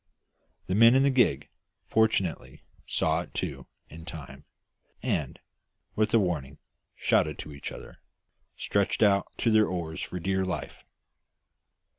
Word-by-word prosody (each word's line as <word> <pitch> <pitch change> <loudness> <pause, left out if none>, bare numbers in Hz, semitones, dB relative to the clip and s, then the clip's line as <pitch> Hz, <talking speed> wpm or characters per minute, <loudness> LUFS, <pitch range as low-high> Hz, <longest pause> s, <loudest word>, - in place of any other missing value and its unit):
The 95 - -2
men 115 +4 +7
in 135 - +5
the 140 - +4
gig 75 - +2 0.4
fortunately 110 -7 0 0.2
saw - - +1
it - - -12
too - - -4 0.2
in 80 +1 -11
time, 70 -4 -10 0.6
and, - - -1 0.6
with 110 0 +1
a 115 - +5
warning 75 -8 -1 0.4
shout 75 -1 +1
to 75 -1 -8
each 70 - -7
other, - - -11 0.6
stretched 100 +2 +1
out 100 -1 +3
to 115 - +1
their 110 -1 +5
oars 85 -3 -4
for 90 - -5
dear 95 +2 0
life. 85 -5 -5
95 Hz, 135 wpm, -28 LUFS, 75-110 Hz, 0.6 s, men